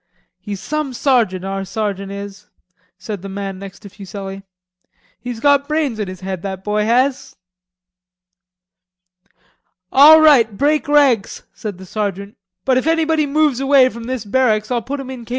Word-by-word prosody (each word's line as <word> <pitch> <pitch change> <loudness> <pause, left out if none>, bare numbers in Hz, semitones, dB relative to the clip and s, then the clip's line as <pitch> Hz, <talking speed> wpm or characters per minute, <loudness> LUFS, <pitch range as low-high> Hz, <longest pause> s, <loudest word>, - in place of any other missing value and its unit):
"He's 205 -2 -6
some 300 +6 -3
sergeant, 230 -8 +1
our 195 0 -3
sergeant 200 -1 -4
is," 200 +1 -9 0.5
said 195 0 -7
the 195 - -8
man 195 -1 -5
next 195 0 -10
to 200 - -11
Fuselli. 195 0 -8 0.8
"He's 245 -2 -6
got 285 +2 +3
brains 300 -7 -1
in 210 - -2
his 185 -1 -9
head, 190 -2 -5
that 190 -1 -6
boy 210 +1 0
has." 255 +4 0 2.6
"All 305 +4 +8
right, 245 -10 +5
break 295 +2 +1
ranks," 280 -8 +2
said 205 -4 -7
the 190 - -11
sergeant, 200 0 -4 0.3
"but 260 -1 +3
if 255 - -1
anybody 320 -2 +1
moves 295 -3 +1
away 270 -1 +4
from 235 -1 -9
this 250 -3 -4
barracks, 215 -1 +1
I'll 240 -1 0
put 275 +5 -5
him 265 -1 -7
in 250 -2 -8
K. - - -18
225 Hz, 160 wpm, -18 LUFS, 195-275 Hz, 2.6 s, All